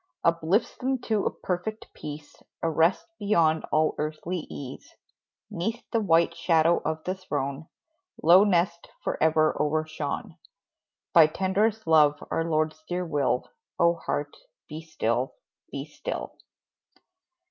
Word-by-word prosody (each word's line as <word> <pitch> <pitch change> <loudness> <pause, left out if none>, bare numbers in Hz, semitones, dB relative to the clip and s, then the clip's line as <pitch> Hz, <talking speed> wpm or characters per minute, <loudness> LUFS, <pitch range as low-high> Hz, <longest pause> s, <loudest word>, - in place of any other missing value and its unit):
Uplifts 170 +5 +2
them 265 +1 0
to 215 -4 0
a - - +3
perfect 190 +4 -4
peace, 150 0 -8 0.3
A 165 - +1
rest 165 +4 +2
beyond 165 -7 +2
all 155 0 +3
earthly 155 +3 -3
ease, 135 -1 -9 0.6
'Neath 215 +5 -3
the 230 - +2
white 170 -5 +3
shadow 165 0 +3
of 160 0 -2
the 185 - -1
throne 145 -5 -4 0.6
Low 175 +4 +8
nest 175 -3 +1
forever 155 0 +2
overshone 155 -1 -2 0.8
By 165 -2 +8
tenderest 205 +6 0
love, 155 -2 +5 0.2
our 165 - +1
Lord's 155 -1 -1
dear 180 0 -1
will; 145 -5 0 0.3
Oh, 170 0 +4
heart, 145 -3 -3 0.3
be 155 +1 -7
still 160 0 -1 0.4
be - - -4
still! - - -6
165 Hz, 125 wpm, -27 LUFS, 155-185 Hz, 0.8 s, Low